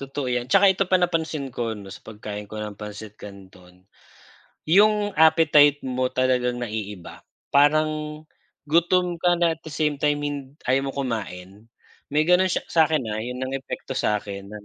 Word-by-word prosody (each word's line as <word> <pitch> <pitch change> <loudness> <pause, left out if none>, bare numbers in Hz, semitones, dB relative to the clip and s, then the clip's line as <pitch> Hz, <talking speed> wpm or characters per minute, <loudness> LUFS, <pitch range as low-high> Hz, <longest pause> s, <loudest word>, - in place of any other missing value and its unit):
Totoo 135 0 -5
yan, 125 0 -2
'saka 195 +4 +5
ito 195 +1 0
pa 185 - +4
napansin 160 -6 -1
ko 115 -2 -3
'no 100 -2 -10
sa - - -11
pagkain 105 -1 -8
ko 110 - -9
ng 105 -1 -6
pansit 105 0 -8
canton, 95 -2 -14 0.8
yung 205 +4 +3
appetite 150 -3 +5
mo 130 0 -1
talagang 125 -1 0
naiiba, 105 -6 -6 0.3
parang 150 +1 +2 0.4
gutom 170 +3 +1
ka 175 0 +3
na 170 -1 +2
at 160 - -10
the 160 - -10
same 150 -1 -1
time 145 0 +1
hin 140 -1 -5
ayaw 135 +2 +1
mo 135 - -4
kumain. 105 -4 -5 0.4
May 150 +2 +1
ganon 180 +2 +4
siya - - -2
sa'kin, 155 -5 +2
ha, 110 - -3
yun 125 +3 -5
ang 130 - -5
epekto 135 - -6
sa'kin 100 -2 -2
non. 105 0 -10
135 Hz, 170 wpm, -24 LUFS, 110-155 Hz, 0.8 s, saka